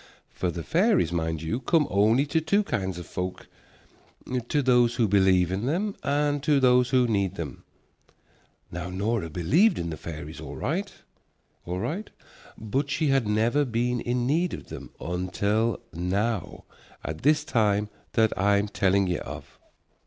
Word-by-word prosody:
For 90 - -2
the 85 -1 -5
fairies, 180 - +2
mind 80 -2 -2
you, 95 +10 -2
come 150 +4 +2
only 110 +7 +3
to 160 +2 0
two 200 +7 +2
kinds 95 - -2
of 90 - -7
folk, 90 0 -5 1.0
to 145 +1 +1
those 120 -2 +4
who 115 -2 +2
believe 95 -3 +3
in 100 +6 -2
them 195 +7 -1
and 145 0 0
to 145 -1 +3
those 125 -1 +4
who 125 -1 +3
need 100 -4 0
them. 80 -6 -6 1.1
Now 90 +1 -5
Nora 100 0 -1
believed 125 - +3
in 85 -1 -3
the 80 - -5
fairies 80 0 -8
all 75 -2 -7
right, 190 +8 -2 0.8
all 90 +1 -2
right, 185 - -3 0.5
but 135 +6 -2
she 150 +1 0
had 135 -5 +2
never 115 +7 +2
been 120 -1 -1
in 120 0 -1
need 165 +7 +1
of - - -12
them - - -8
until 100 +6 -1
now, 95 +4 -2 0.4
at 80 0 -4
this 150 +1 +3
time 105 -7 +1 0.3
that 110 -2 +2
I'm 100 +2 +2
telling 100 0 +2
ye 90 -1 -1
of. - - -9
110 Hz, 160 wpm, -26 LUFS, 90-140 Hz, 1.1 s, those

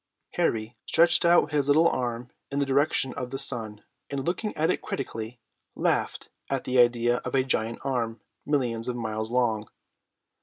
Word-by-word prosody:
Harry 110 +1 -1
stretched 170 +2 +4
out 170 -3 +4
his 145 -2 +1
little 155 +4 +5
arm 120 -3 -2 0.2
in 140 - -4
the 140 - +2
direction 135 -1 +1
of 125 -3 -5
the 135 - -4
sun, 110 -6 0 0.3
and, 140 -1 -3
looking 190 +5 -1
at 160 +3 +2
it - - -2
critically, 115 -2 -5 0.4
laughed - - -1 0.2
at - - -1
the 125 0 +1
idea 120 0 +4
of - - -4
a 130 - +3
giant 115 -3 -1
arm 120 -4 -2 0.2
millions 120 -6 -1
of 125 - -2
miles 110 -2 -3
long. 115 -3 0
125 Hz, 165 wpm, -27 LUFS, 115-140 Hz, 0.4 s, little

